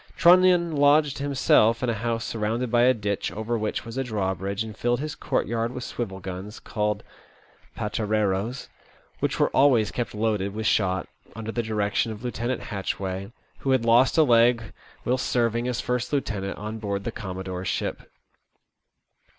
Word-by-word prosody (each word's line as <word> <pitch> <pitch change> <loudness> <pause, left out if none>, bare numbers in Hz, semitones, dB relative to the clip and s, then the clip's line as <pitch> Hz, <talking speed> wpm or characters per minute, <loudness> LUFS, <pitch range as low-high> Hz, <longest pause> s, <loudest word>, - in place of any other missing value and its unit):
Trunnion 175 -1 +5
lodged 145 0 +4
him 140 0 -2
self 115 -3 +4
in - - +1
a 115 - +1
house 115 +1 -2
surrounded 115 +2 -2
by 120 -1 +4
a 130 - +6
ditch, 100 -2 -2
over 110 +2 -2
which 110 0 -2
was 115 +3 -5
Sk - - -9
drawbridge, 100 -2 -2
and 110 -2 -8
filled 120 +2 0
his 150 +1 -3
courtyard 115 0 -1
with 125 -1 -5
swivel 100 -7 -4
guns 95 +3 -7
called 105 -1 -2 0.7
pateraroes, 105 +2 -1 0.5
which - - -1
were - - +3
always 125 -6 +4
kept 120 -3 -3
loaded 105 -2 -1
with 110 0 -3
shot, 95 -3 +1 0.3
under 110 0 -5
the 120 - -1
direction 110 0 0
of 110 +2 -8
Lieutenant 120 +1 -2
Hatchway, 95 -1 -4 0.3
who 135 - -3
had 130 -3 +3
lost 120 +5 +4
a 160 - +7
leg 115 -3 +3 0.3
whilst 125 +1 0
serving 120 0 +1
as 125 -1 -1
first 125 -1 -2
lieutenant 105 -9 -2
on 110 +1 -5
board 100 -2 -3
the 115 - -3
commodore's 95 -3 -5
ship. - - -2
115 Hz, 165 wpm, -25 LUFS, 105-125 Hz, 0.7 s, a